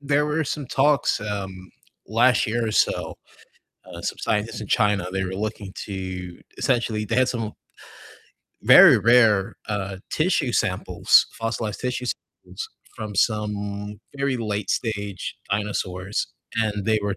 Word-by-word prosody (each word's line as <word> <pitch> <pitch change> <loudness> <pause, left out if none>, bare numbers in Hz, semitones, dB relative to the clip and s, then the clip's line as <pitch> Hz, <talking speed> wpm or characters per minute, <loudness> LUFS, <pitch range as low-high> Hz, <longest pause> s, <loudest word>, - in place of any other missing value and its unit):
There 145 +1 +1
were 150 +2 0
some 145 0 -4
talks, 140 0 +2
um, 95 -3 -5 0.4
last 120 +4 +3
year 115 +1 0
or - - -2
so, - - +1 0.7
uh, - - -9
some - - -3
scientists 105 +1 -1
in 105 - -6
China, 105 -3 +2
they 95 0 -1
were 95 0 -4
looking 105 -1 -4
to 95 -3 -6 0.2
essentially, 115 -4 0
they 115 - -1
had 130 0 +3
some 115 -3 -3 1.1
very - - +9
rare, 115 -5 +4
uh, 100 -2 -3
tissue 155 -6 +1
samples, - - +3
fossilized 115 -2 -3
tissue 125 0 -2 0.4
samples - - -7 0.3
from 110 -2 -6
some 105 -1 -1 0.2
very 140 -1 0
late-stage 105 -2 -3
dinosaurs, 100 -2 -2 0.3
and 105 -3 0
they 110 -1 +3
were 100 -1 -1
105 Hz, 135 wpm, -24 LUFS, 100-120 Hz, 1.1 s, very